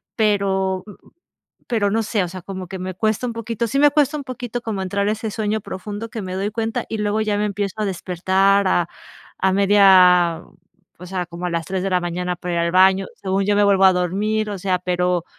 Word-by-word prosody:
pero 195 -3 +1 0.9
pero 210 -4 +1
no 225 +2 +1
sé, 210 -1 0
o - - -5
sea, 185 0 -8
como 185 -1 -7
que 190 -1 -6
me 185 0 -5
cuesta 220 +5 -1
un 240 - -3
poquito, 230 0 -3
sí, 275 - -1
me 290 0 +6
cuesta 295 0 +2
un - - -5
poquito 245 -2 -5
como 215 -4 -3
entrar 200 +2 -1
a - - +2
ese 220 0 -4
sueño 215 0 -1
profundo 205 +3 -6
que 220 0 -5
me 185 -1 -5
doy 195 +2 -2
cuenta 225 0 -2
y 220 - -4
luego 210 +1 0
ya 210 -1 0
me 210 - 0
empiezo 200 -1 -3
a - - +1
despertar 190 +2 +1
a 175 -2 +1 0.5
a 190 0 +2
media 185 -4 +5 0.6
o 180 - -9
sea, 180 -1 -3
como 175 +1 -6
a - - -2
las 165 -2 -2
3 190 +1 -2
de 195 - -2
la 180 - +2
mañana 180 +1 -3
para 175 0 -4
ir 170 - +1
al 170 0 0
baño, 190 +1 +4
según 195 0 -1
yo 205 0 +2
me 205 - +4
vuelvo 195 -1 +4
a 190 - +6
dormir, 210 +5 -1
o 200 - -4
sea, 185 -1 0
pero 180 -1 0
195 Hz, 230 wpm, -21 LUFS, 185-215 Hz, 0.9 s, me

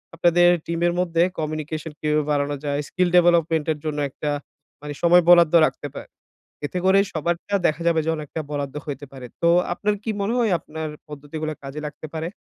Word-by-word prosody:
আপনাদের 175 +1 +4 0.2
টিমের 170 +1 0
মধ্যে 170 -1 +2 0.2
কমিউনিকেশন 155 0 -4
কিভাবে 150 0 +1
বাড়ানো 145 0 0
যায়। 145 0 -1
স্কিল 180 -1 +1
ডেভেলপমেন্ট 170 -3 +4
এর 150 - -12
জন্য 150 -1 -2
একটা 150 +2 -4 0.5
মানে 150 0 -6
সময় 175 0 +6
বরাদ্দ 170 -2 +7
রাখতে 145 - -4
পা - - -6 0.6
এতে 180 +5 -3
করে 195 +1 +5
সবারটা 170 +5 -2
দেখা 155 +2 -2
যাবে 165 -1 +3
যে - - 0
অনেকটা 155 +1 -6
বরাদ্দ 145 -1 -3
হইতে 145 0 -5
পারে। 130 -2 -9 0.2
তো 170 - +3 0.3
আপনার 210 +3 -1
কি 225 - -4
মনে 210 +4 0
হয় 230 -4 +2
আপনার 160 0 -6 0.2
পদ্ধতিগুলা 150 +2 -5
কাজে 135 +2 -6
লাগতে 155 +1 -9
পারে? 160 0 -3
160 Hz, 180 wpm, -23 LUFS, 150-175 Hz, 0.6 s, বরাদ্দ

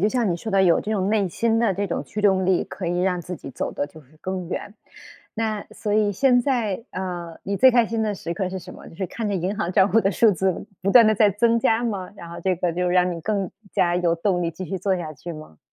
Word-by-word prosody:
就 210 - +3
像 235 -5 0
你 170 - 0
说 220 - -6
的 195 -1 +4
有 175 -3 +4
这 215 - -5
种 200 -2 0
内 205 -4 +2
心 225 +5 +1
的 225 -5 +2
这 200 +2 -1
种 170 - -2
驱 210 +8 -6
动 190 -2 +3
力， 185 -2 +2
可 185 - -7
以 175 +1 0
让 180 -1 +1
自 180 +1 -6
己 135 - -9
走 - - -3
得 145 - -2
就 155 +2 -15
是 150 +2 -23
更 185 -2 -4
远。 205 +3 -5 0.6
那 220 -2 -2
所 210 - -4
以 210 -1 +2
现 250 +3 +4
在 235 -5 -1
呃， 175 -3 -5
你 200 0 -2
最 260 +3 +7
开 240 -2 +4
心 225 -1 -1
的 210 -1 -1
时 170 - -5
刻 185 +2 -2
是 190 0 -5
什 180 +1 -11
么？ - - -12
就 - - -15
是 190 -1 -2
看 220 +4 -4
着 200 - -1
银 185 +3 -1
行 170 - -1
账 190 +1 +4
户 225 - +5
的 195 - +1
数 215 +3 +4
字 190 0 -1
不 195 +2 0
断 230 -1 +8
地 215 - +4
在 210 0 +4
增 230 +3 +2
加 225 +1 +2
吗， 195 -5 -3
然 170 -2 -10
后 170 - -8
这 185 -2 +1
个 175 0 -1
就 180 +1 0
让 180 0 +2
你 165 - -7
更 200 0 -1 0.2
加 175 0 +2
有 175 -2 +2
动 175 +1 0
力 170 - -1
继 175 +3 -7
续 190 +2 -4
做 190 0 0
下 160 -3 -5
去 170 +5 -8
吗？ 155 - -11
190 Hz, 300 characters per minute, -23 LUFS, 175-215 Hz, 0.6 s, 断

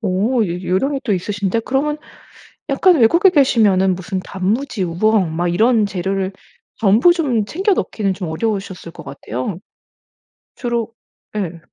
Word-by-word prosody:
어 215 +4 +1
요 175 +2 -4
요령이 270 +11 0
또 215 - 0
있으신데? 200 +3 -1
그러면 290 +5 -1 0.7
약간 345 +6 +4
외국에 340 - +5
계시면은 215 - +3
무슨 185 +1 -4
단무지, 200 +5 -2
우엉 185 0 +1
막 175 +1 0
이런 220 +4 +3
재료를 190 0 -2 0.4
전부 225 - +4
좀 265 - 0
챙겨 385 - 0
넣기는 205 - -1
좀 180 -3 -5
어려우셨을 190 -1 -3
것 160 - -11
같아요. 140 - -5 1.0
주로 235 -2 -3 0.4
예. 175 -5 -3
205 Hz, 285 characters per minute, -18 LUFS, 185-245 Hz, 1.0 s, 외국에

